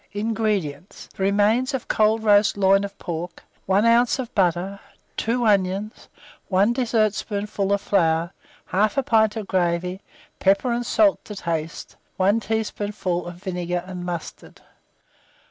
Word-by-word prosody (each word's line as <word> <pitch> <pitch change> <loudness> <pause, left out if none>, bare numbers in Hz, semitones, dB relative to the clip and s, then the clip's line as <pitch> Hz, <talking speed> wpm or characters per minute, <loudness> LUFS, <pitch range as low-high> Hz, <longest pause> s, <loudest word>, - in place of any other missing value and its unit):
INGREDIENTS. 205 -6 -2
The - - -8
remains 210 +7 +2
of 255 - -5
cold 220 +1 +2
roast 205 -1 +4
loin 195 0 +4
of 200 0 -7
pork, 170 -1 -6 0.2
1 195 +3 +3
oz. 235 +2 +4
of 255 -3 -6
butter, 190 0 0 0.4
2 240 +1 0
onions, 200 +1 0 0.4
1 200 +4 +3
dessertspoonful 215 -4 -1
of 200 0 +1
flour, 165 -3 +1 0.4
1/2 215 +7 +1
pint 220 -1 +3
of 220 -2 -4
gravy, 180 0 -1 0.4
pepper 200 +6 +2
and 240 0 -2
salt 310 -3 +3
to 210 - -8
taste, 165 -3 -4 0.2
1 200 +4 +3
teaspoonful 205 -5 -3
of 175 - -7
vinegar 180 -2 -3
and 185 -1 -7
mustard. 175 -2 -7
200 Hz, 130 wpm, -23 LUFS, 180-220 Hz, 0.4 s, roast